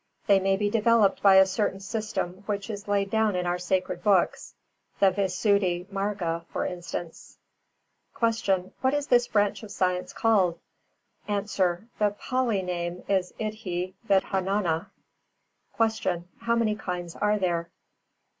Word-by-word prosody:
They 200 -1 +5
may 195 0 +1
be 205 +1 0
developed 220 -1 +3
by 195 -1 +7
a 190 0 +8
certain 195 0 -1
system 195 -2 -4
which 205 +1 -3
is 205 0 -7
laid 200 -1 0
down 220 -3 +2
in 180 0 -1
our 175 0 -1
sacred 185 +1 -1
books, 195 -4 +1 0.4
the 195 -1 +5
Visuddhi 190 -1 +1
Mārga 195 -4 -2
for - - -3
instance. 175 -1 -6 0.8
366. 230 -1 +1
Q. 190 -1 +1
What 260 +2 +2
is 290 -1 -1
this 245 -3 +3
branch 205 -1 +1
of 215 - -10
science 180 -2 -1
called? 190 -7 +2 0.7
A. 205 -1 +1
The 205 +2 -1
Pālī 250 -7 0
name 175 0 -3
is 190 -2 +1
Iddhi 190 -4 -3 0.2
vidhanānā. 190 -2 +1 0.9
367. 220 -6 0
Q. 185 +6 -20
_How 235 0 +3
many 220 -2 +1
kinds 180 -5 -5
are 210 0 +1
there? 170 -3 -1
195 Hz, 145 wpm, -27 LUFS, 180-215 Hz, 0.9 s, a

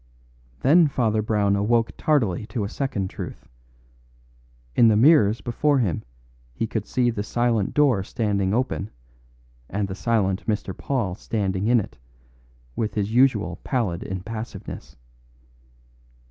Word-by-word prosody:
Then 160 +4 +5
Father 115 -6 0
Brown 105 -2 +1
awoke 115 +3 +1
tardily 110 - +1
to 115 -5 -3
a 100 - -3
second 115 -7 -2
truth. - - -8 1.3
In 120 - +6
the 110 - +5
mirrors 115 -5 +5
before 145 +5 +1
him 100 - 0 0.5
he 115 - -1
could 110 -1 -4
see 125 -2 +1
the 105 - -3
silent 115 -1 0
door 140 -9 +4
standing 100 -2 -1
open, 110 -3 -1 0.8
and 100 +1 -1
the 95 - -5
silent 100 -2 0
Mr. 105 -3 -2
Paul 120 -10 -2
standing 100 -1 -2
in 120 0 +5
it, 65 - -7 0.8
with 105 -3 -2
his 105 +1 -1
usual 115 -8 +3
pallid 105 -10 -1
impassiveness. 110 - -7
110 Hz, 130 wpm, -24 LUFS, 100-120 Hz, 1.3 s, In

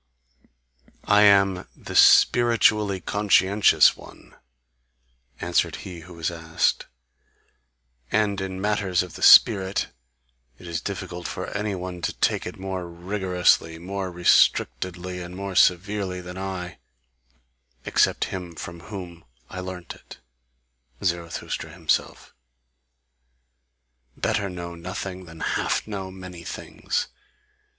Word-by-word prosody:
"I 105 0 +4
am 100 -2 +4
THE - - -9
SPIRITUALLY 105 -5 +5
CONSCIENTIOUS 100 +1 +4
ONE," - - -16 1.0
answered 85 0 0
he 90 -2 -8
who 85 +2 -13
was 80 0 -2
asked, 80 -1 -1 1.2
"and 100 -2 +1
in 95 -1 -5
matters 100 -3 0
of 90 - -10
the - - -10
spirit 95 0 +6 0.7
it - - -14
is 85 -2 -4
difficult 90 -3 -5
for - - -6
any 100 0 -2
one 90 -1 -6
to - - -2
take - - 0
it - - -8
more 95 -2 -5
rigorously, 90 -2 +1
more 95 +2 -5
restrictedly, 90 +1 +1
and 90 +1 -8
more 100 0 -5
severely 95 +1 +2
than 90 0 -9
I, 95 -4 -6 1.1
except - - +2
him 90 -3 -6
from 85 +2 -8
whom 90 -3 -9 0.3
I 95 - -6
learnt 90 -1 -7
it, - - -14 0.9
Zarathustra 85 -3 -3
himself. 85 -3 -2 1.8
Better 100 -1 -1
know 85 -1 -7
nothing 90 +2 -6
than 80 -1 -12
half - - -1
know 100 -3 -5
many 95 -2 -10
things! - - -4
90 Hz, 110 wpm, -24 LUFS, 85-100 Hz, 1.8 s, spirit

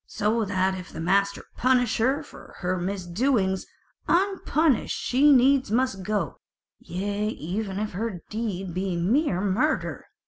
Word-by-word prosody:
So 220 +2 0
that 190 -1 +1
if 185 -2 -7
the - - -8
master 200 +4 +1
punish 245 -2 +2
her 260 +5 +3
not 300 +1 -7
for - - -14
her 180 0 0
misdoings, 190 +2 0 0.4
unpunished 335 - +2
she 280 +4 +4
needs 265 -1 +4
must 230 -3 0
go; 210 +2 -2 0.4
yea 205 +3 -3
even 195 +1 -3
if 215 +1 -2
her 195 -2 -4
deed 195 -5 -3
be 185 0 -2
mere 195 - +1
murder." 210 +11 0
210 Hz, 140 wpm, -26 LUFS, 190-255 Hz, 0.4 s, she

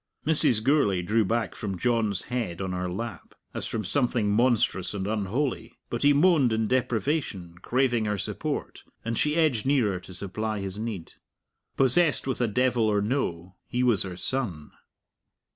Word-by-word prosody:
Mrs. 135 -8 +3
Gourlay 110 -10 +2
drew 110 +5 +2
back 115 +3 -1
from 95 -3 -4
John's 110 -4 0
head 115 -8 -3
on 95 -1 -3
her 90 0 -2
lap, 115 +6 -6 0.2
as - - -3
from 110 -3 -3
something 120 -2 +1
monstrous 110 -4 +1
and 95 -1 -3
unholy. 110 +6 -2
But 120 - -2
he 145 - +5
moaned 145 -4 +4
in 110 0 0
deprivation, 120 - -1
craving 120 -3 +1
her 105 -1 -1
support, - - -4 0.2
and 115 0 -1
she 150 +6 +1
edged 155 -10 +2
nearer 115 -10 +2
to 95 - -12
supply 105 +3 -3
his 95 +1 -5
need. 110 -7 -5 0.6
Possessed 140 +4 +4
with 130 -2 -2
a 120 - +2
devil 125 +1 +1
or 105 -1 +1
no, 95 -7 -2
he 125 +1 -1
was 120 -6 +3
her 90 -2 -5
son. 95 - -3
110 Hz, 160 wpm, -26 LUFS, 100-130 Hz, 0.6 s, he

